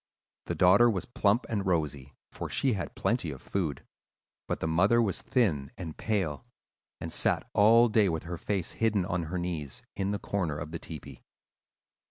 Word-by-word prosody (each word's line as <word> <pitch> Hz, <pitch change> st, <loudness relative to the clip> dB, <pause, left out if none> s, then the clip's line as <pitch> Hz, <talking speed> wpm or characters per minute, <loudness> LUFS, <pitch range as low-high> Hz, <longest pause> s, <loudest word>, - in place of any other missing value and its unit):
The -, -, -2 dB
daughter 100 Hz, +7 st, +6 dB
was 95 Hz, -5 st, -1 dB
plump 110 Hz, -1 st, +1 dB
and 105 Hz, -3 st, -1 dB
rosy, 75 Hz, -7 st, -1 dB, 0.2 s
for -, -, -6 dB
she 130 Hz, -3 st, +2 dB
had 95 Hz, -5 st, -4 dB
plenty -, -, 0 dB
of -, -, -7 dB
food; 80 Hz, -8 st, -3 dB, 0.6 s
but -, -, -2 dB
the -, -, -2 dB
mother 95 Hz, +9 st, +3 dB
was 105 Hz, -6 st, +1 dB
thin 80 Hz, -, +1 dB
and 85 Hz, -4 st, -6 dB
pale, 95 Hz, -9 st, -1 dB, 0.6 s
and -, -, -5 dB
sat -, -, +1 dB
all 115 Hz, +3 st, +6 dB
day 105 Hz, -3 st, +3 dB
with 80 Hz, -2 st, -2 dB
her 85 Hz, 0 st, -6 dB
face 95 Hz, -4 st, -2 dB
hidden 105 Hz, -5 st, +1 dB
on 90 Hz, -3 st, -2 dB
her 90 Hz, +4 st, -4 dB
knees, 80 Hz, -7 st, -4 dB
in 95 Hz, 0 st, -1 dB
the 105 Hz, -, 0 dB
corner 90 Hz, -7 st, -2 dB
of 75 Hz, 0 st, -6 dB
the 85 Hz, -, -5 dB
tepee. 80 Hz, -4 st, -9 dB
90 Hz, 180 wpm, -29 LUFS, 80-105 Hz, 0.6 s, daughter